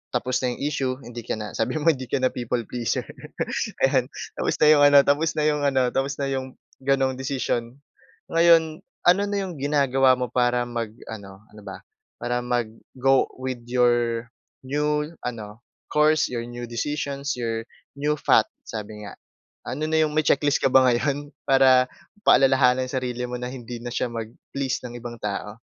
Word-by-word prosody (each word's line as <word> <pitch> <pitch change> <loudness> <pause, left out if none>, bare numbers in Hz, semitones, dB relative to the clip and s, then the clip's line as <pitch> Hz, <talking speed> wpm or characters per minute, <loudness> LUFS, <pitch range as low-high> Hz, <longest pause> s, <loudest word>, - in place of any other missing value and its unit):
tapos 125 +1 0
na 130 - +1
yung - - -7
issue, 135 -3 -1
hindi 120 0 -7
ka - - -2
na 105 -1 -6
sabi - - -1
mo 160 +2 +4
hindi 130 -2 -7
ka - - +1
na 130 - +3
people 120 0 -2
pleaser, 120 -3 -2 0.8
ayan, - - +3 0.3
tapos - - 0
na 150 - +4
yung 145 - +4
ano, 145 0 +7
tapos 155 +3 +2
na 155 - +2
yung 150 -1 +1
ano, 135 -2 +2
tapos 135 +1 0
na 140 - -1
yung 130 -1 -4 0.3
gano'n 135 0 +2
desisyon. 125 -2 -2 0.5
Ngayon, 165 -1 +4 0.3
ano 180 +3 +6
na 205 0 -2
yung 185 -3 -6
ginagawa 135 -2 +3
mo 125 - -1
para 120 -1 +2
mag-ano, 110 -4 -7
ano 105 - -13
ba? 95 - -7 0.4
Para 120 0 -1
mag-go 125 +2 0 0.2
with 130 -2 -4
your 120 -1 +2 0.4
new 150 +2 0 0.2
ano, 110 -3 -6 0.3
course, 155 +1 +3
your 120 -2 -3
new 120 0 -6
decisions, 140 +3 -3
your 115 -1 -2 0.4
new 150 +1 +1
path - - +4 0.2
sabi 105 -1 -7
nga. - - -10 0.5
Ano 140 +5 -3
na 160 0 +2
yung 155 - 0
may 155 - +3
checklist 145 +1 +3
ka - - +5
ba 130 -1 +6
ngayon, 145 +4 -1 0.2
para 130 -1 +5 0.4
paalalahanan 130 -1 +5
ang - - -8
sarili 125 -2 -2
mo 125 - -4
na 125 - -4
hindi 120 -2 -7
na 120 - -5
siya 125 - 0
mag-please 120 +4 -4
ng 120 -1 -7
ibang 120 0 -7
tao? 105 +1 -4
130 Hz, 175 wpm, -24 LUFS, 120-145 Hz, 0.8 s, ano